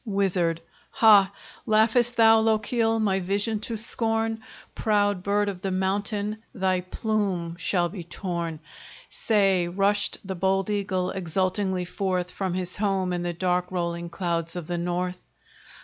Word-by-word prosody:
WIZARD 190 -6 0 0.3
Ha! 205 -4 +6 0.4
laugh'st 230 +3 +3
thou, 225 -1 +6
Lochiel, 225 +1 +1
my 195 -3 +1
vision 200 +4 -1
to 225 +1 -4
scorn? 225 0 0 0.3
Proud 205 -3 +1
bird 205 +2 +1
of 190 -3 -4
the 195 - -2
mountain, 200 +3 -1
thy 185 -2 +1
plume 185 -3 -2
shall 175 -1 +1
be 185 -2 -7
torn! 170 -2 -4 0.5
Say, 195 -5 +2
rushed 200 +3 +1
the 190 - -3
bold 190 +2 0
eagle 190 -3 -1
exultingly 185 +1 -1
forth, 180 -1 -2
From 190 -2 -3
his 180 -1 -3
home 195 -3 0
in 175 - -2
the 175 0 -2
dark 180 +1 0
rolling 170 -1 -2
clouds 170 -1 -2
of 175 -3 -5
the 175 +1 -3
north? 180 +1 -3
190 Hz, 140 wpm, -26 LUFS, 180-210 Hz, 0.5 s, Ha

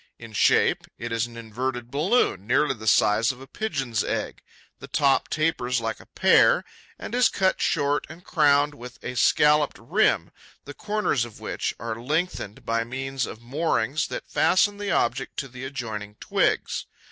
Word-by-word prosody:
In 115 -1 -11
shape, - - +3
it 120 0 -6
is 115 0 0
an 115 0 -12
inverted 120 +2 -4
balloon, 150 - +1
nearly 135 +3 +3
the 110 -3 -9
size 110 +3 +4
of 125 - -13
a 135 - -10
Pigeon's 135 - -2
egg. - - -3 0.4
The - - -9
top 140 -3 +2
tapers 130 -5 0
like 115 -1 -3
a - - -16
pear - - +4 0.3
and - - -8
is 250 +1 +4
cut 190 -1 +1
short 145 +1 +1
and 165 +3 -12
crowned 145 -3 +3
with 125 -3 -11
a - - -4
scalloped 150 +5 +3
rim, 175 - +1 0.3
the - - -8
corners 210 - 0
of 120 -2 -9
which - - -3
are 115 0 -5
lengthened 150 - -2
by 115 0 0
means 135 +2 -3
of 110 - -10
moorings 145 +1 0
that - - -6
fasten 205 +2 +2
the 205 -1 -3
object 130 -2 0
to 140 - -3
the 125 0 -8
adjoining 110 -6 -6
twigs. - - 0
130 Hz, 170 wpm, -25 LUFS, 115-150 Hz, 0.4 s, size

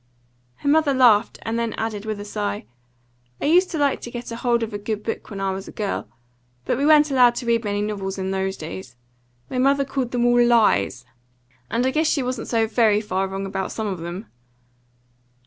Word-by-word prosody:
Her 285 - -7
mother 295 -1 +3
laughed, 235 -4 +4
and 225 +1 -2
then 230 -1 -1
added, 220 -2 -4
with 215 -1 -3
a 205 - -6
sigh: 100 - -3 0.7
"I - - -3
used 360 +5 +4
to 320 - -3
like 285 -2 +1
to - - -7
get 240 0 -7
hold 235 0 0
of 225 -1 -5
a 205 - -3
good 210 0 -4
book 225 - -4
when 200 - -6
I 195 0 0
was 190 +1 -6
a - - -8
girl; 205 -2 -3 0.6
but 250 - 0
we 285 - +2
weren't 300 -1 +6
allowed 250 -3 +5
to 245 - -4
read 230 0 +1
many 205 -1 -1
novels 195 -2 -3
in 190 0 -2
those 190 0 -2
days. 155 -4 -8 0.5
My 255 - -3
mother 275 +1 +3
called 265 -2 -2
them 245 -1 0
all 240 0 +5
LIES. 210 - +3 0.6
And 240 +2 0
I 260 - +2
guess 315 +3 +1
she 285 -4 +1
wasn't 250 -1 -3
so 225 -2 +2
very 220 -2 +3
far 195 -3 -1
wrong 195 +1 -4
about 195 0 -3
some 220 - -3
of 190 -4 -3
them." 175 +5 -6
225 Hz, 215 wpm, -22 LUFS, 195-250 Hz, 0.7 s, weren't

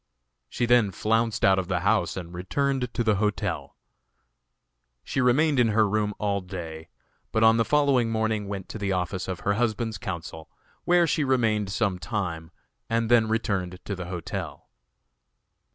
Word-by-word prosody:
She 120 - -1
then 120 -3 +4
flounced 115 +4 0
out 95 0 +5
of 90 - -3
the 90 -2 -1
house - - +1
and 85 -2 -7
returned 125 +7 -1
to 120 - +1
the 110 -3 +2
hotel. 105 0 -2 1.3
She 130 - -1
remained 135 +3 +3
in 120 - +5
her 110 0 +3
room 105 0 0
all 100 -1 -1
day, 85 -3 -8 0.4
but 110 - +2
on 110 0 +6
the 115 - +3
following 140 -4 +2
morning 110 -2 -1
went 100 -2 -5
to 110 - -6
the 100 -1 -1
office 90 +1 -2
of 95 -2 -4
her 100 - +1
husband's 110 0 -1
counsel, 80 -3 -6 0.4
where 175 -1 +4
she 155 -1 +1
remained 115 -7 +1
some 100 -3 0
time, 90 -7 -3 0.4
and 115 0 0
then 115 -2 +5
returned 100 -5 -1
to 100 - -3
the 90 -1 -6
hotel. 90 -2 -6
105 Hz, 165 wpm, -26 LUFS, 95-115 Hz, 1.3 s, on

